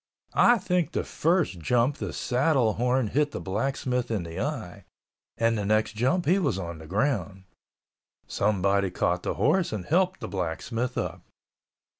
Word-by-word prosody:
I 240 0 +5
think 180 -5 -1
the - - 0
first 165 - 0
jump 120 - +1
the - - -4
saddle 130 -3 +1
horn 125 0 +1
hit 145 +5 +1
the - - -6
blacksmith 125 +4 -2
in 110 -6 -1
the 85 0 -7
eye, - - -4 0.5
and 115 0 +2
the 105 - -2
next 110 +1 +1
jump 145 +11 +1
he 180 +6 +3
was 140 - 0
on 85 -3 -5
the 80 - -11
ground. 100 - -1 0.8
Somebody 100 -1 +1
caught 90 0 0
the - - -2
horse 170 +5 +2
and 105 -4 -4
helped 185 +3 +1
the - - -4
blacksmith 100 +7 -3
up. - - -3
120 Hz, 160 wpm, -27 LUFS, 100-145 Hz, 0.8 s, I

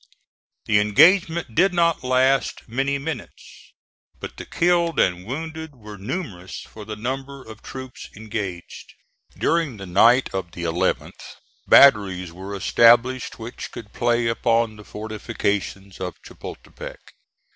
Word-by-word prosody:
The 105 -1 +3
engagement 160 - +4
did 180 - +3
not 170 -3 +2
last 130 +1 +2
many 135 +4 -1
minutes, 150 +3 -8 0.5
but - - -8
the - - -8
killed 170 -2 +1
and 90 +1 +1
wounded 160 +2 -6
were 105 -3 -11
numerous 100 - -5
for 110 -1 -11
the 110 0 -6
number 135 +4 -5
of 110 -2 -12
troops 130 -1 -9
engaged. 105 -5 -6 0.4
During 165 -8 0
the 100 - -8
night 115 +8 +5
of 95 -3 -4
the 85 - -6
11th 85 +1 -2 0.3
batteries 95 -9 +5
were 95 +3 -7
established 120 +5 +4
which 115 +1 -8
could 105 -3 -10
play 120 0 +1
upon 115 -1 +1
the 105 - -12
fortifications 100 -2 -4
of 90 -1 -5
Chapultepec. - - -10
115 Hz, 125 wpm, -23 LUFS, 100-135 Hz, 0.5 s, night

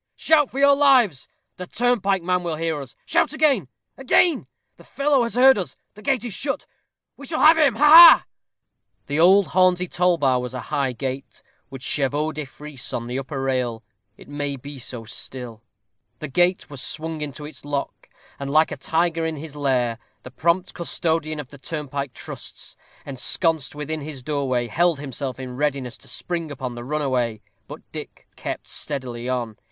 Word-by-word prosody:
"Shout 305 -3 +3
for 265 - -9
your 280 0 +6
lives. 255 - +3 0.3
The 180 - -7
turnpike 200 -6 +1
man 180 +1 +1
will 170 -2 -3
hear 160 -2 -2
us. 130 -4 -11
Shout - - +1
again 285 - +2 0.3
again! 300 +5 +2 0.3
The - - -16
fellow 280 -1 +1
has 235 0 -2
heard 260 -2 +6
it. 185 - -5 0.2
The 210 - -14
gate 260 -2 0
is 235 - -4
shut. 275 +7 -2 0.5
We 280 - -10
have 315 0 +5
him. 300 -7 +3
Ha, 295 - +3
ha!" 330 +2 +10 0.8
The 145 +2 -2
old 190 +3 +5
Hornsey 185 0 +3
toll 180 0 +2
bar 130 -4 +2
was 125 0 -6
a - - -3
high 140 -3 +1
gate, 130 +2 -6 0.3
with 135 -2 -9
chevaux 145 +3 0
de 155 -1 -5
frise 140 -1 -8
on 120 - -3
the 125 +2 -3
upper 135 +1 -5
rail. 125 -4 -1 0.3
It - - -15
may 145 -1 -3
be 140 +1 -9
so 120 -1 -6
still. 120 -1 -6 0.6
The 155 - -5
gate 175 +5 +2
was 140 -3 -5
swung 160 0 -3
into 150 0 -5
its 150 -3 -10
lock, 145 -1 -5 0.3
and, 140 0 -4
like 155 +3 +3
a - - -4
tiger 165 0 0
in 160 0 -2
his 150 0 -9
lair, 125 -5 0 0.2
the 130 - -10
prompt 170 +6 0
custodian 160 -2 -1
of 140 -4 -7
the 140 - -13
turnpike 140 -3 -5
trusts, - - -8 0.3
ensconced 145 +3 -1
within 150 +1 -4
his 140 -3 -7
doorway, 135 -4 -1
held 165 +6 +1
himself 135 -2 -5
in 125 -1 -7
readiness 140 -4 -1
to - - -12
spring 170 -3 -3
upon 130 -3 -5
the 120 0 -8
runaway. 130 -5 -1 0.3
But - - -9
Dick - - -9
kept - - -6
steadily 125 -4 -3
on. 120 -4 -3
150 Hz, 180 wpm, -23 LUFS, 130-180 Hz, 0.8 s, ha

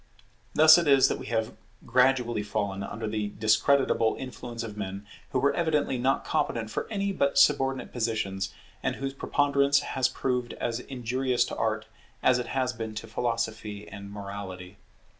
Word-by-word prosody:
Thus 155 +2 +9
it 170 - -1
is 135 -2 +6
that - - -2
we - - -8
have 110 0 -1 0.3
gradually 125 -3 +2
fallen 100 -2 -2
under 110 +3 -5
the 105 -1 -2
discreditable 110 +2 +3
influence 120 -3 -6
of 110 -2 -7
men 100 0 -5 0.2
who - - -1
were 140 +2 +3
evidently 155 -6 0
not 130 +2 +1
competent 110 -2 -1
for - - -3
any 200 -2 -1
but 140 -7 0
subordinate 135 -2 +3
positions, 110 -4 -2 0.3
and - - -1
whose 135 0 -4
preponderance 140 0 +2
has 130 -1 0
proved 125 -2 -2
as 115 0 -2
injurious 125 0 -1
to - - -6
Art 110 -1 -1 0.4
as 130 -1 +4
it 125 - -4
has 130 -1 -1
been 110 -1 -6
to 105 - -5
Philosophy 110 -2 -3
and 100 0 -9
Morality. 100 -2 -7
120 Hz, 160 wpm, -28 LUFS, 105-135 Hz, 0.4 s, Thus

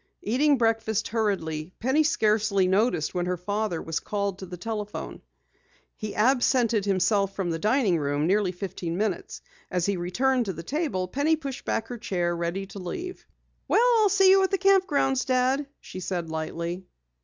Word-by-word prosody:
Eating 280 +6 +3
breakfast 225 -2 0
hurriedly, 185 -7 -2
Penny 265 +6 +2
scarcely 215 -8 +2
noticed 190 -4 +1
when 180 -1 -1
her 180 0 -1
father 205 -1 -2
was 165 -1 -3
called 200 -2 -3
to 190 - -7
the 180 0 -8
telephone. 210 +2 -5 0.7
He 215 -1 -6
absented 240 -2 +2
himself 195 0 +1
from 185 -3 -1
the 165 - -2
dining 210 - +2
room 145 +1 0
nearly 195 +1 +2
fifteen 180 -2 -5
minutes. 205 -3 -3 0.3
As 180 -2 0
he 200 -2 0
returned 245 +9 +1
to 190 - -3
the 165 0 -8
table, 235 - -2
Penny 285 - +1
pushed 275 -4 -7
back 225 - -1
her 245 -2 -6
chair, 175 -6 -1
ready 170 +3 -2
to 200 +1 -10
leave. 350 - -6 0.4
"Well, 475 - +4
I'll 425 -2 +4
see 390 -1 +5
you 385 0 +6
at 380 - +2
the 390 - +1
camp 390 -1 +4
grounds, 270 -4 +1
Dad," 260 +2 +1
she 185 - -9
said 175 -3 -3
lightly. 170 +3 -4
205 Hz, 175 wpm, -26 LUFS, 180-255 Hz, 0.7 s, you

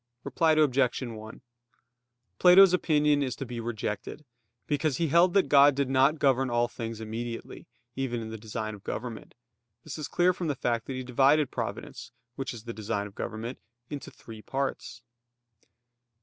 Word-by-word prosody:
Reply 160 -1 +2
Obj. 140 -4 +2
1: 110 -2 -8 1.0
Plato's 185 +1 +8
opinion 150 -4 +2
is 130 -3 -2
to 135 - -6
be 120 -1 -6
rejected, 115 +4 -5 0.4
because 145 -2 0
he 165 -2 0
held 175 +4 +4
that 195 - +4
God 145 0 +6
did 140 -1 -1
not 135 +4 +4
govern 135 -2 +2
all 120 0 +1
things 115 -1 -6
immediately, 115 +1 -6 0.3
even 130 -3 -2
in 110 -1 -6
the 110 - -6
design 110 0 -5
of 100 -1 -12
government; 120 -2 -6 0.5
this 155 0 -7
is 150 - -4
clear 180 +1 +2
from 175 -1 -4
the 145 - -1
fact 115 -2 -2
that 135 - -4
he 130 0 -4
divided 135 +4 +3
providence, - - -6 0.2
which 135 -1 -4
is 115 -3 -9
the 115 0 -6
design 105 -1 -3
of 100 - -10
government, 115 +4 -5 0.3
into 145 -2 -6
three 110 -2 -12
parts. 135 -2 -4
130 Hz, 165 wpm, -28 LUFS, 115-145 Hz, 1.0 s, Plato's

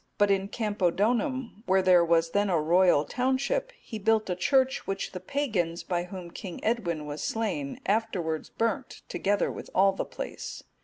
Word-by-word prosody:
But 205 -1 +4
in 195 0 +1
Campodonum,(242) 220 - 0
where 190 0 +4
there 180 -2 +6
was 165 0 +2
then 205 0 +2
a 170 -3 +2
royal 170 -1 +4
township, 265 - 0
he 220 - -7
built 215 -1 +2
a - - 0
church 265 +8 +2
which 195 0 -3
the 185 - -6
pagans, 185 - -1
by 175 -1 -1
whom 180 -2 -8
King 180 -1 -7
Edwin 175 -9 0
was 150 +1 -5
slain, 185 -12 -2
afterwards 195 -7 -1
burnt, 225 -3 -2
together 200 -1 0
with - - -8
all 195 +1 +5
the 195 - -3
place. - - -7
195 Hz, 165 wpm, -28 LUFS, 175-225 Hz, -, there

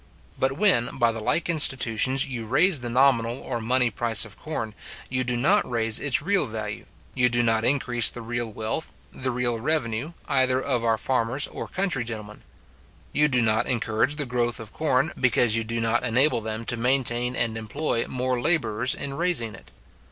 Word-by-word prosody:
But 135 0 +1
when, 145 - +2
by 115 -1 +3
the 110 - -6
like 160 +9 -1
institutions, 130 -5 +4
you 120 -4 -6
raise 155 - +3
the 120 -1 -5
nominal 125 -1 +2
or 120 -3 -4
money 125 +1 +1
price 115 -1 +2
of 105 - -10
corn, 115 -9 -5 0.4
you 130 0 -1
do 125 -1 -1
not 190 +12 +2
raise 115 -2 +2
its 140 -1 +1
real 200 +3 +1
value; 110 -1 -6 0.3
you 125 -1 +2
do 120 0 +2
not 115 -1 +1
increase 120 -2 +2
the 120 - -9
real 120 0 -3
wealth, 110 +9 -4 0.2
the 130 0 -3
real 120 -1 -1
revenue, 125 +1 -2
either 130 -1 +2
of 130 -3 -1
our 115 -1 +2
farmers 130 +3 0
or - - -7
country 185 -10 -2
gentlemen; 105 -2 -7 0.7
you 150 0 +3
do 125 -4 +1
not 110 -1 +1
encourage 120 +3 0
the 145 -1 -3
growth 120 -2 -1
of 110 -2 -10
corn, 155 0 0
because 120 -3 +3
you 115 - 0
do 115 +1 -3
not 115 +1 0
enable 125 +2 +2
them 110 +1 -5
to 120 - -1
maintain 125 0 +1
and 115 -3 -1
employ 115 +3 -2
more 125 -1 -2
labourers 120 -7 +1
in 140 -1 -5
raising 160 -9 0
it. - - -14
120 Hz, 185 wpm, -25 LUFS, 115-135 Hz, 0.7 s, institutions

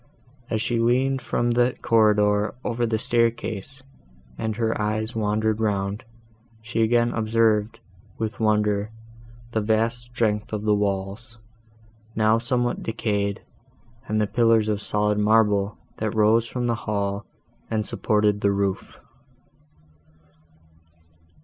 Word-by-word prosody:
As 110 -1 -1
she 120 +1 0
leaned 130 +3 +2
from 120 0 0
the 120 +1 +2
corridor, 105 -2 +3
over 120 0 -1
the 110 -1 0
staircase, 115 +2 -1 0.5
and 110 - -3
her 115 0 0
eyes 110 +2 -2
wandered 110 0 0
round, 100 -1 -1 0.6
she 115 +1 -3
again 120 +1 +3
observed, 110 0 +1 0.4
with 110 -1 -4
wonder, 105 -1 +1 0.6
the 110 - 0
vast 115 +3 0
strength 110 -3 -1
of 105 -1 -2
the 105 -1 +3
walls, 100 +3 -2 0.8
now 110 +1 +3
somewhat 120 +1 -1
decayed, 100 -3 -2 0.6
and 110 0 0
the 105 - +2
pillars 115 0 +3
of 105 -1 -1
solid 105 0 0
marble, 105 -1 +2 0.2
that 110 -1 -2
rose 110 +2 +3
from 125 +1 -3
the 120 - +1
hall, 100 -2 -2 0.5
and 110 -1 -1
supported 105 -1 +1
the 100 - +3
roof. 100 -1 -2
110 Hz, 120 wpm, -24 LUFS, 105-115 Hz, 0.8 s, corridor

